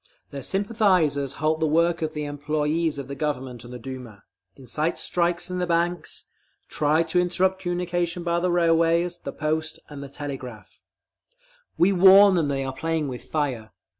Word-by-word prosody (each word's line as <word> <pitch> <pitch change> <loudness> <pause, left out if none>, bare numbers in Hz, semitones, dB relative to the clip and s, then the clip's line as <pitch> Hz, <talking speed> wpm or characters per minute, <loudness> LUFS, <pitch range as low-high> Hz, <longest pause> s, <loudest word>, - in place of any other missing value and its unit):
Their 140 - -6
sympathisers 185 - +1
halt 155 +2 0
the 160 - +1
work 170 +2 +2
of 155 0 -3
the 150 0 -3
employees 150 +2 -1
of 140 -2 -6
the 140 - -6
Government 135 -4 -4
and 120 - -11
the 125 - -6
Duma, 120 -4 -9 0.3
incite 135 +6 -2
strikes 175 +1 -1
in 180 - -2
the 180 - -1
banks, 170 0 -1 0.4
try 155 +2 +2
to 165 +2 0
interrupt 185 +2 +1
communication 175 -1 -2
by 170 0 0
the 180 +1 0
railways, 170 0 +2
the - - -6
post 155 +1 -2
and 145 -2 -8
the 140 - -8
telegraph…. 130 -6 -8 1.0
We 180 +3 +4
warn 195 +2 +8
them 165 -5 +1
that 140 - -1
they 135 - -2
are 135 0 -4
playing 160 +1 -2
with 125 -1 -7
fire. 130 -8 -3
160 Hz, 170 wpm, -24 LUFS, 140-175 Hz, 1.0 s, warn